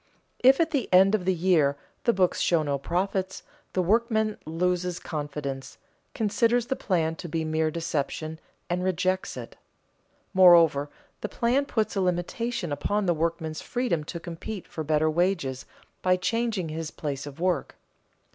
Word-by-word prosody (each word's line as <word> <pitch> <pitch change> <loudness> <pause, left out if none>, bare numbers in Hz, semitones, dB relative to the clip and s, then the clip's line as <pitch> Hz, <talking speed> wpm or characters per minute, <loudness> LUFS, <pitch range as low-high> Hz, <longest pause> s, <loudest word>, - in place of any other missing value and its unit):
If 265 +2 +6
at 325 -1 +2
the 280 -5 -1
end 190 +2 +6
of 200 -4 +1
the 190 - +3
year 160 -5 +3 0.3
the 235 - +5
books 185 -4 +1
show 170 -3 +3
no 140 -2 -1
profits, 190 +4 -2 0.3
the 185 - +1
workman 220 +2 +1
loses 180 +2 0
confidence, 145 -4 -5 0.4
considers 230 +2 +2
the 265 - -1
plan 165 -7 0
to 170 - -7
be 160 0 -1
mere 155 0 +1
deception, 160 -1 -3 0.3
and 180 +1 -1
rejects 185 +1 0
it. - - -8 0.8
Moreover, 170 -6 +6 0.3
the 210 - -4
plan 260 +4 +1
puts 220 -5 -1
a 195 - +1
limitation 180 - -1
upon 205 +8 0
the 175 - +3
workman's 160 -1 -2
freedom 240 -11 -1
to 170 - -5
compete 175 +4 -7
for 160 - -5
better 155 +1 +2
wages 155 -5 0 0.3
by 185 0 +3
changing 220 -3 -1
his 160 0 -4
place 145 -2 -5
of 145 +2 -10
work. 180 0 0
180 Hz, 155 wpm, -27 LUFS, 160-205 Hz, 0.8 s, If